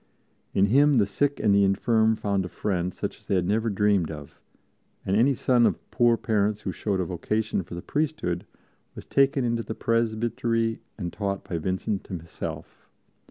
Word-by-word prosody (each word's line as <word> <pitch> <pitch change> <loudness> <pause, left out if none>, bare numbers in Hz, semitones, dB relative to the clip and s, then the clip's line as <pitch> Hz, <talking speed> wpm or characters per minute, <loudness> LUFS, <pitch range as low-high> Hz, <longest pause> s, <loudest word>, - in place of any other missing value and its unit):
In 95 - +5
him 140 +6 +4
the 105 - +4
sick 140 +9 -1
and 105 -2 +3
the 100 0 +5
infirm 110 +3 +3
found 100 -3 -1
a 90 - -6
friend 90 -3 -2
such - - -5
as - - -28
they 100 - +1
had 90 -1 +1
never 110 +4 +1
dreamed 100 -4 +2
of 75 -2 -9 0.7
and 95 - +1
any 130 +6 +4
son 120 -1 +3
of - - -4
poor 120 -2 +3
parents 105 -2 0
who 95 - -3
showed 95 +2 -2
a 90 - 0
vocation 105 +5 -1
for 85 0 -9
the 85 - -7
priesthood 150 - -2 0.5
was - - -9
taken 135 -1 +2
into 115 -1 0
the 110 - -6
presbytery 115 0 0 0.2
and 90 -5 -4
taught 100 -2 -3
by 85 - -2
Vincent 95 +3 -2
himself. 85 -3 -7
105 Hz, 180 wpm, -26 LUFS, 95-115 Hz, 0.7 s, In